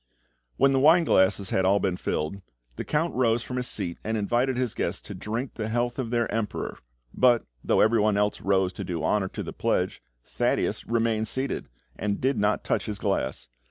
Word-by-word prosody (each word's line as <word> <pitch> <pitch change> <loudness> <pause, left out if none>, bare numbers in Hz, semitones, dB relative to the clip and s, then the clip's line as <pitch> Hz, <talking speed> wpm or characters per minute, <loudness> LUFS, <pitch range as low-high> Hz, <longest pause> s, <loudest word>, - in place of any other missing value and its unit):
When 135 +1 +4
the 135 - +3
wine 160 +5 +6
glasses 95 - +2
had 95 - +2
all 100 +2 +4
been 95 -3 0
filled, 90 +2 -3 0.3
the - - -4
Count 160 +3 0
rose 120 -2 +2
from 125 - -5
his 125 0 -1
seat 90 -5 -2
and 110 +1 -1
invited 120 +5 +1
his 125 -3 0
guests - - -2
to - - -8
drink 115 +5 -4
the 110 -1 -4
health 120 +2 -1
of 125 -3 -2
their 120 -1 +1
Emperor; 110 -2 -3 0.3
but, 120 -2 +4 0.2
though - - +3
everyone 110 -2 +3
else 105 0 0
rose 95 -2 +1
to 100 - -5
do 90 -3 -4
honour 105 -3 +1
to - - -6
the - - -7
pledge, - - -1 0.2
Thaddeus - - -1
remained 115 -1 +1
seated, 130 - -3 0.3
and 100 -1 -2
did 130 -3 +1
not 105 +1 +1
touch - - -1
his 105 -1 -3
glass. 100 - -2
110 Hz, 195 wpm, -26 LUFS, 100-125 Hz, 0.3 s, wine